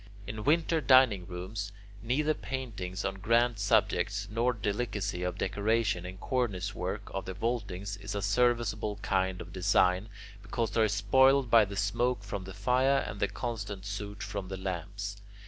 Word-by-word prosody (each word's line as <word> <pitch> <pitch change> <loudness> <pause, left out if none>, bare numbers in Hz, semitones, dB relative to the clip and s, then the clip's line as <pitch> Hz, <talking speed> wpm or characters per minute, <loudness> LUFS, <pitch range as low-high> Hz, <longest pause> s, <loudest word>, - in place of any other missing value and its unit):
In 105 +1 -5
winter 160 +1 +3
dining 130 -10 +5
rooms, 95 +3 -5 0.3
neither 150 +7 +1
paintings 110 -11 -5
on 95 0 -2
grand 115 +2 +2
subjects 100 0 +1
nor 115 +3 +2
delicacy 105 -4 -2
of 90 0 -2
decoration 105 -2 0
in 95 - -7
the - - -16
cornice 105 -7 -1
work 100 +2 -4
of 95 - -3
the 95 - -5
vaultings 100 -3 -3
is 100 +1 -6
a 100 - -1
serviceable 110 -1 +1
kind 95 -1 0
of 90 - -10
design, 95 +1 +2 0.3
because 110 +1 -2
they 115 - +2
are 110 - +5
spoiled 130 +5 +4
by 115 -2 +7
the 100 0 -7
smoke 115 +3 0
from 100 -1 -5
the 95 - -8
fire 130 +6 +2
and 100 - -6
the 100 - +2
constant 105 -5 -5
soot 105 0 -5
from 95 0 -4
the 95 0 -5
lamps. 100 +2 -5
105 Hz, 165 wpm, -30 LUFS, 95-115 Hz, 0.3 s, by